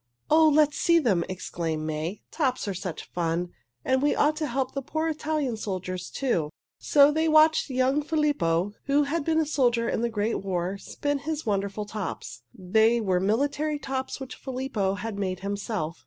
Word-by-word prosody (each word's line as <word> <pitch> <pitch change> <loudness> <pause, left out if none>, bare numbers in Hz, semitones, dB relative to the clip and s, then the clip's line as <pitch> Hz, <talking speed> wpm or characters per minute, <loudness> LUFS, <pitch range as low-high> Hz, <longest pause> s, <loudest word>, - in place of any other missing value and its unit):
"Oh, 315 +1 +6
let's 300 0 +3
see 335 -1 +4
them!" 210 - +2
exclaimed 165 -4 -3
May. 155 +6 -3
"Tops 260 -8 -1
are 200 - -1
such 180 -2 -6
fun, 175 0 -1 0.4
and 260 0 +2
we 290 - +2
ought 300 +1 +3
to 305 -1 -1
help 265 0 -2
the 275 - -2
poor 315 +4 -2
Italian 305 -5 -1
soldiers, 185 -3 -4
too." 180 - -1 0.3
So 285 0 +5
they 315 +2 +1
watched 310 0 +5
young 260 +3 +2
Filippo, 290 - +1
who 285 +1 +3
had 295 +2 -1
been 320 +1 +1
a 320 - +2
soldier 245 -6 +1
in - - -1
the 235 - 0
great 220 0 -1
war, 185 0 -2
spin 290 +7 -2
his 310 +2 -4
wonderful 200 0 -1
tops. 205 - -6
They 220 - +2
were 190 -5 +1
military 285 +9 0
tops 265 -2 -4
which 265 -1 -7
Filippo 250 -7 -2
had 205 0 -5
made 185 -2 -2
himself. 200 -4 -3
240 Hz, 175 wpm, -26 LUFS, 190-290 Hz, 0.4 s, Oh